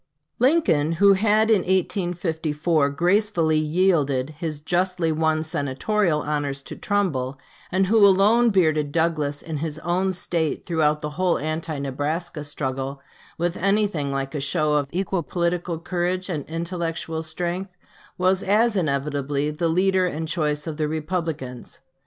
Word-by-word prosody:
Lincoln, 245 - +3
who 200 +4 +5
had 215 +2 +3
in 215 - +5
1854 170 -5 0
gracefully 175 0 +2
yielded 155 -4 +1
his 155 -1 -5
justly 175 +1 0
won 160 0 +1
Senatorial 155 +4 0
honors 145 -2 -2
to - - -8
Trumbull, 145 -11 -1 0.3
and 190 +1 +2
who 215 +2 +4
alone 205 +5 +5
bearded 155 -7 +2
Douglas 155 -3 0
in 160 -2 -4
his 155 0 -3
own 180 +4 0
State 170 -4 -2
throughout 155 -3 +1
the 150 - -4
whole 180 -2 +3
anti 155 +1 -3
Nebraska 145 +4 -3
struggle, 135 -1 -4 0.4
with 175 +1 -1
anything 195 -7 +1
like 135 +1 -3
a 150 - -2
show 150 +1 +1
of 145 -2 +1
equal 185 0 -1
political 170 0 -2
courage 180 +3 -2
and 150 -6 -3
intellectual 165 -1 -3
strength, 175 +3 -4 0.4
was 185 +1 +2
as 215 +3 +2
inevitably 145 -3 -1
the 165 +2 -1
leader 185 +2 +2
and 160 -1 -4
choice 150 -2 -1
of 160 -3 -5
the 155 -1 0
Republicans. 155 -5 -4
165 Hz, 140 wpm, -23 LUFS, 150-185 Hz, 0.4 s, who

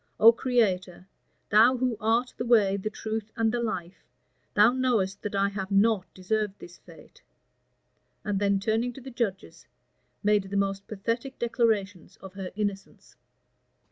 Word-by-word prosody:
O 225 +1 +9
Creator! 195 -8 0 0.5
thou 230 +5 +6
who 250 -1 0
art 230 +3 +1
the - - -4
way, 215 -5 +4
the 200 +2 -3
truth, 220 0 -5
and 225 -1 +1
the 240 0 -1
life, 185 -6 -4 0.5
thou 210 +3 +6
knowest 235 -7 0
that 205 -1 -4
I 200 0 +2
have 195 -1 -5
not 200 -1 +2
deserved 205 +2 -2
this 175 0 -13
fate;" - - -17 1.0
and 205 -2 -1
then 200 -1 +2
turning 225 +4 -1
to 270 - -11
the 265 +1 -9
judges, 220 -6 -4 0.6
made 210 -1 +3
the 200 - -2
most 195 0 -1
pathetic 230 +6 -3
declarations 220 -6 -1
of 190 -1 -12
her 190 -2 -6
innocence. 200 -2 -5
210 Hz, 150 wpm, -27 LUFS, 195-230 Hz, 1.0 s, O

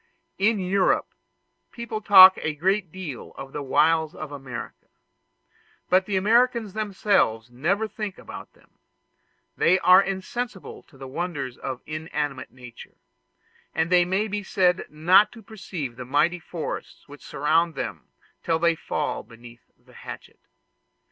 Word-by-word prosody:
In 215 +3 +3
Europe 190 0 +1 0.6
people 235 -2 -6
talk 190 -2 +9
a 155 -1 -2
great 185 +2 0
deal 165 -9 -8
of 135 0 -9
the 145 - -4
wilds 155 +3 +2
of 155 -2 -7
America, 130 -4 -8 1.0
but 185 +1 +3
the 200 -2 0
Americans 230 +1 +2
themselves 195 - 0
never 175 - -1
think 210 -2 -6
about - - -11
them: - - -28 0.8
they 180 +3 +3
are 185 +1 +6
insensible 195 +2 -5
to 135 - -22
the 135 0 -9
wonders 140 -4 -4
of 130 -2 -6
inanimate 150 -3 -4
nature, 125 -2 -14 0.8
and 160 +2 0
they 180 -1 +5
may 190 +5 -1
be 210 0 -3
said 185 -2 +1
not 175 +7 +4
to 225 -2 -13
perceive 180 - -7
the 125 - -6
mighty 155 +7 +1
forests 165 -1 -7
which 145 0 -13
surround 160 +4 0
them - - -6 0.3
till 165 -1 0
they 170 +1 +2
fall 155 -2 -3
beneath 120 0 -16
the - - -23
hatchet. - - -11
175 Hz, 140 wpm, -24 LUFS, 145-195 Hz, 1.0 s, talk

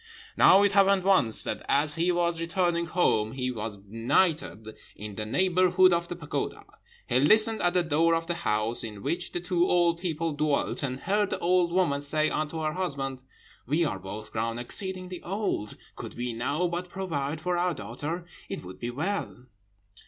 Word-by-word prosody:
"Now 195 +2 +6
it 205 - +3
happened 195 -1 +4
once, 185 - +4
that - - -4
as 145 +1 +4
he 170 +3 +1
was 170 -1 0
returning 170 0 0
home 110 -11 +1
he 125 -1 -2
was 110 -3 -5
benighted 115 - -1 0.2
in 105 0 -8
the 105 +1 -5
neighbourhood 185 - +3
of 170 0 0
the 175 - -5
pagoda. 155 -4 -4 0.4
He 125 - +2
listened 220 - +5
at 175 0 +1
the 180 - +3
door 165 +1 +2
of 165 0 -2
the 170 - -1
house 115 -8 +1
in 105 -3 -7
which 175 +1 -2
the - - -3
two 175 0 0
old 170 -1 +2
people 165 -3 -2
dwelt, 150 -1 0
and 130 -2 -3
heard 205 +1 +1
the - - -2
old 175 0 +2
woman 170 -6 +1
say 155 +2 +1
unto 155 +1 -2
her 155 0 -1
husband, 135 -7 -3 0.5
'We 155 +6 +2
are 100 - -3
both 100 +3 -8
grown 115 +1 -2
exceedingly 185 +7 -5
old; 190 - -3 0.2
could - - -8
we 120 0 -3
now 140 +9 -1
but 175 +1 -4
provide 160 -6 -3
for 180 +2 -1
our 175 -1 0
daughter, 145 - -5 0.2
it - - -5
would 90 +1 -10
be 120 - -4
well.' 150 -1 -3
165 Hz, 180 wpm, -27 LUFS, 125-180 Hz, 0.5 s, Now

